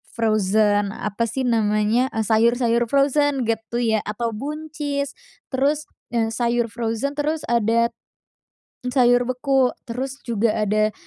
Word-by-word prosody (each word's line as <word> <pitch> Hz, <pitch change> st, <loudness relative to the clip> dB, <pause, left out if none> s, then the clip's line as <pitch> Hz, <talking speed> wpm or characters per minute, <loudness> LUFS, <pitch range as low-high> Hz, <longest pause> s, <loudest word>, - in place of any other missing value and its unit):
frozen 210 Hz, -2 st, +2 dB
apa 210 Hz, +3 st, -2 dB
sih 260 Hz, +4 st, -3 dB
namanya, 220 Hz, +1 st, +2 dB
e 220 Hz, -, +1 dB
sayur-sayur 235 Hz, +2 st, +2 dB
frozen, 280 Hz, +1 st, +2 dB
getu 230 Hz, +1 st, -2 dB
ya, 220 Hz, -2 st, +2 dB
atau 230 Hz, +2 st, -2 dB
buncis. 290 Hz, +2 st, -4 dB, 0.4 s
Terus, 285 Hz, +3 st, +1 dB, 0.3 s
eee, 225 Hz, -1 st, +1 dB
sayur 235 Hz, 0 st, 0 dB
frozen, 230 Hz, +3 st, -2 dB
terus 295 Hz, +2 st, -2 dB
adat 230 Hz, 0 st, +2 dB, 0.9 s
m 250 Hz, -, -2 dB
sayur 245 Hz, -1 st, +4 dB
beku, 255 Hz, +1 st, +1 dB, 0.2 s
terus 265 Hz, +4 st, -4 dB
juga 230 Hz, -2 st, 0 dB
ada 215 Hz, 0 st, +1 dB
235 Hz, 125 wpm, -22 LUFS, 220-265 Hz, 0.9 s, sayur